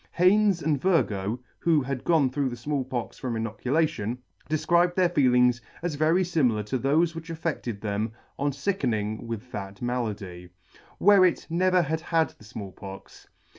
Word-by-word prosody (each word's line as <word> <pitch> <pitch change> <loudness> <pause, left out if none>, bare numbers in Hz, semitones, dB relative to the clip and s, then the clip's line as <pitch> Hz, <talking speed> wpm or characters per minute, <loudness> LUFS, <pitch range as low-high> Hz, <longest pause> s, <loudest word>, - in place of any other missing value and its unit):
Haynes 190 0 +4
and 145 -3 +1
Virgoe, 115 - +1 0.2
who 165 -3 +3
had 130 -1 -4
gone 155 -6 +3
through 140 0 0
the 120 - -6
Small 140 +3 -2
Pox 125 -2 -5
from 125 -3 -3
inoculation, 120 +1 -1 0.3
defcribed 175 +3 +2
their 185 -2 +3
feelings 125 -6 +3 0.2
as 175 -2 -1
very 160 +5 +2
limilar 130 - +1
to 125 +5 -2
thofe 155 +6 +2
which 165 0 -8
affected 155 -9 -3
them 105 +1 -2 0.3
on 145 +1 +1
ficken 140 - -1
ing 110 +2 -4
with 115 +2 -6
that 100 -1 -6
malady. 105 -8 -4 0.5
Wherret 190 -3 +5
never 180 +1 +3
had 160 +1 -2
had 165 -1 +1
the - - -20
Small 105 -3 -7
Pox. 95 +1 -11
135 Hz, 160 wpm, -26 LUFS, 115-165 Hz, 0.5 s, Wherret